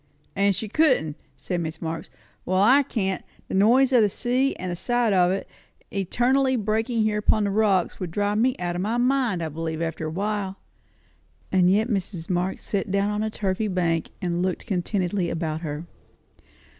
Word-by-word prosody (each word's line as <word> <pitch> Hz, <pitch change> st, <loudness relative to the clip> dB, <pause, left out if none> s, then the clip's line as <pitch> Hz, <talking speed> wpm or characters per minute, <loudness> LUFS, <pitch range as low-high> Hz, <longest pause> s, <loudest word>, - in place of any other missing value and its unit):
"And 200 Hz, 0 st, +3 dB
she 215 Hz, +4 st, -4 dB
couldn't!" 240 Hz, -, +2 dB, 0.2 s
said 175 Hz, +6 st, -3 dB
Mrs. 160 Hz, -1 st, -5 dB
Marx. 165 Hz, 0 st, -4 dB, 0.3 s
"Well, 185 Hz, +1 st, 0 dB
I 250 Hz, +8 st, +6 dB
can't. 195 Hz, -8 st, -2 dB, 0.3 s
The -, -, -5 dB
noise 245 Hz, +7 st, +4 dB
of 245 Hz, -, +6 dB
the 210 Hz, -, +4 dB
sea, 255 Hz, +6 st, 0 dB
and 185 Hz, -1 st, -4 dB
the -, -, -2 dB
sight 240 Hz, +3 st, +1 dB
of 180 Hz, -2 st, +4 dB
it, 195 Hz, +1 st, -2 dB, 0.4 s
eternally 255 Hz, +7 st, +2 dB
breaking 225 Hz, +1 st, 0 dB
there 210 Hz, -1 st, +1 dB
upon 210 Hz, 0 st, +2 dB
the 200 Hz, -, 0 dB
rocks, 200 Hz, -3 st, +2 dB
would 180 Hz, -, -3 dB
drive 205 Hz, +4 st, 0 dB
me 250 Hz, +2 st, +2 dB
out 175 Hz, -1 st, -3 dB
of 175 Hz, -, -2 dB
my 220 Hz, +5 st, 0 dB
mind, 245 Hz, -7 st, +1 dB
I 160 Hz, -, -2 dB
believe, 160 Hz, +1 st, -4 dB
after 165 Hz, -1 st, -3 dB
a -, -, -3 dB
while." 195 Hz, +2 st, -2 dB, 0.9 s
And 180 Hz, -1 st, +4 dB
yet 210 Hz, +4 st, +3 dB
Mrs. 190 Hz, -6 st, -3 dB
Marx 180 Hz, +1 st, -1 dB
sat 200 Hz, 0 st, -2 dB
down 200 Hz, +2 st, +1 dB
upon 210 Hz, 0 st, -1 dB
a 220 Hz, -, 0 dB
turfy 205 Hz, 0 st, -1 dB
bank 170 Hz, -4 st, 0 dB
and 175 Hz, -1 st, 0 dB
looked 185 Hz, -1 st, -2 dB
contentedly 185 Hz, -2 st, -1 dB
about 160 Hz, -1 st, -3 dB
her. 155 Hz, 0 st, -5 dB
195 Hz, 185 wpm, -24 LUFS, 175-220 Hz, 0.9 s, I